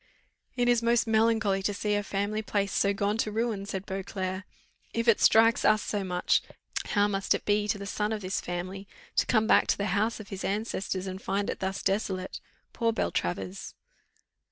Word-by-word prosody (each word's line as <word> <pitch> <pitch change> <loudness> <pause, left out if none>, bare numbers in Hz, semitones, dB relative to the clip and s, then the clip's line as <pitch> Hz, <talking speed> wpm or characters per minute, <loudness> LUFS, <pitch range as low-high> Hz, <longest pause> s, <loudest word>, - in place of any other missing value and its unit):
"It 245 -1 +1
is 240 -1 +4
most 235 0 +3
melancholy 220 -3 +2
to 200 +1 -1
see 210 +1 -1
a 205 - +2
family 205 +2 -2
place 200 -2 -1
so 200 - +3
gone 200 +1 0
to 215 - 0
ruin," 215 -2 -1
said 190 -1 -4
Beauclerc; 190 0 -4 0.5
"if 230 +1 0
it 230 - +5
strikes 225 +1 +5
us 215 0 +4
so 205 -2 -2
much, 180 -1 +1 0.5
what 205 0 +4
must 195 -1 +1
it - - -5
be 205 0 +2
to 210 - 0
the 200 - -7
son 210 +1 -1
of 215 -1 -2
this 185 0 -2
family, 185 +3 -5 0.3
to - - +2
come 220 -2 +3
back - - +5
to - - +2
the 200 - -1
house 220 +3 +1
of 205 -2 -10
his 195 -1 -6
ancestors, 195 -2 -2
and 190 0 -5
find 200 +1 -1
it - - -7
thus 190 +1 -3
desolate! 190 -2 -1 0.3
Poor 230 -1 +1
Beltravers!" 95 - -3
205 Hz, 195 wpm, -28 LUFS, 195-220 Hz, 0.5 s, it